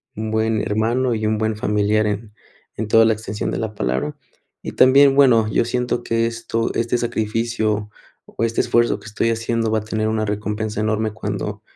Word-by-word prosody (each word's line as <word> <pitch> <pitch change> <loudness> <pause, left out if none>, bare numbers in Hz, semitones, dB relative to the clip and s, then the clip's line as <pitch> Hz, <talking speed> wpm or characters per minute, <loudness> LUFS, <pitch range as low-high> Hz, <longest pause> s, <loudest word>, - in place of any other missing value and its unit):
un 110 +1 -4
buen 110 -1 +1
hermano, 115 +5 0
y 110 0 -2
un 110 0 +1
buen 110 0 -1
familiar 105 0 +1
en 105 +1 -4 0.4
en 110 - -3
toda 115 +1 +5
la 110 - +4
extensión 105 -1 -4
de - - -2
la 110 -1 -3
palabra. 100 - -2 0.4
Y - - -6
también, 135 +1 +6
bueno, 125 -6 +5
yo - - +2
siento 125 0 -1
que 115 0 0
esto 115 0 -3
este 120 +1 0
sacrificio 110 -2 -1 0.4
o - - -5
este 115 0 +1
esfuerzo 120 0 +1
que - - -17
estoy 110 +1 -1
haciendo 115 0 -1
va 110 - +2
a - - -9
tener 110 0 -2
una 110 0 -1
recompensa 105 +1 -3
enorme 110 0 0
cuando, - - -4
110 Hz, 190 wpm, -20 LUFS, 110-115 Hz, 0.4 s, también